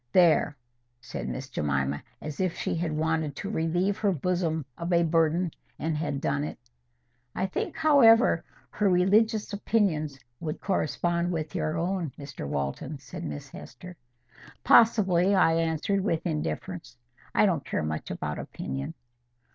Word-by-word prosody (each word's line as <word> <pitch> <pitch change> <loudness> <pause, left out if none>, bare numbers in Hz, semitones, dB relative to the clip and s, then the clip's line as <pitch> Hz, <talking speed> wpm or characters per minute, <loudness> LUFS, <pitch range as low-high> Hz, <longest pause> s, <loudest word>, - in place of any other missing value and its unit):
There!" 165 -4 +4 0.4
said 115 - -6
Miss 130 0 -5
Jemima, 70 - -1 0.2
as 150 -2 -6
if 185 -3 0
she - - -1
had 165 -1 -1
wanted 155 -1 0
to 200 - -5
relieve 180 +4 0
her 205 -2 +2
bosom 165 -2 -1
of 170 +1 -4
a 170 -1 +4
burden, 165 +1 +2 0.3
and 160 0 -1
had 150 -2 -2
done 140 +1 0
it. 150 - -5 0.8
"I 185 - 0
think, 190 - -3
however, 250 - +6 0.3
her 205 -2 +1
religious 210 +4 +3
opinions 180 -9 0 0.2
would 155 -2 -4
correspond 175 -1 0
with 155 -3 -3
your 155 +1 -1
own, 175 -3 -1
Mr 140 - -7
Walton," 70 - -3
said 140 +6 -9
Miss 145 -3 -6
Hester. 180 +8 -10 0.7
"Possibly," 200 -4 +5
I 175 -3 +5
answered, 165 +4 0
with 165 -5 -1
indifference; 75 -5 -4 0.4
"I - - +5
don't - - +1
care - - -2
much 75 0 -3
about 75 0 -4
opinion." 70 +1 -5
165 Hz, 145 wpm, -27 LUFS, 145-185 Hz, 0.8 s, however